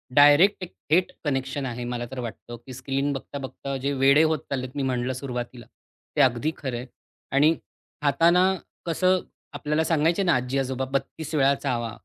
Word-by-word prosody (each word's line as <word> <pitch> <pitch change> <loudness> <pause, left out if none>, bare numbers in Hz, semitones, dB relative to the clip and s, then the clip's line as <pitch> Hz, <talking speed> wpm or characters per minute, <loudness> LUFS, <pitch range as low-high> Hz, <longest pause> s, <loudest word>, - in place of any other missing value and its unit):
Direct, 145 +8 +7
एक 180 - -8 0.2
थेट 175 +4 +3
connection 135 0 -1
आहे. 125 -1 -4
मला 120 0 -3
तर 130 - -6
वाटतं, 120 0 -7
की 125 +3 -12
स्क्रीन 135 +2 -1
बघता-बघता 140 0 -6
जे 135 +2 -1
वेडे 140 +2 +5
होत 160 -1 +2
चाललेत, 130 -2 -2
मी 140 - -1
म्हटलं 125 0 -1
सुरुवातीला 125 -2 -5 0.5
ते - - +4
अगदी 130 +4 +2
खरं 130 -4 -4
आहे. 125 - -6 0.5
आणि 145 +4 +5 0.5
खाताना 165 +5 +4 0.4
कसं, 185 +2 +2 0.3
आपल्याला 150 +2 0
सांगायचे 165 +4 +2
ना, 175 - +3
आजी-आजोबा 130 +1 -1
32 155 +3 -3
वेळा 140 -1 +4
चावा, 120 -5 -2
135 Hz, 160 wpm, -25 LUFS, 130-150 Hz, 0.5 s, Direct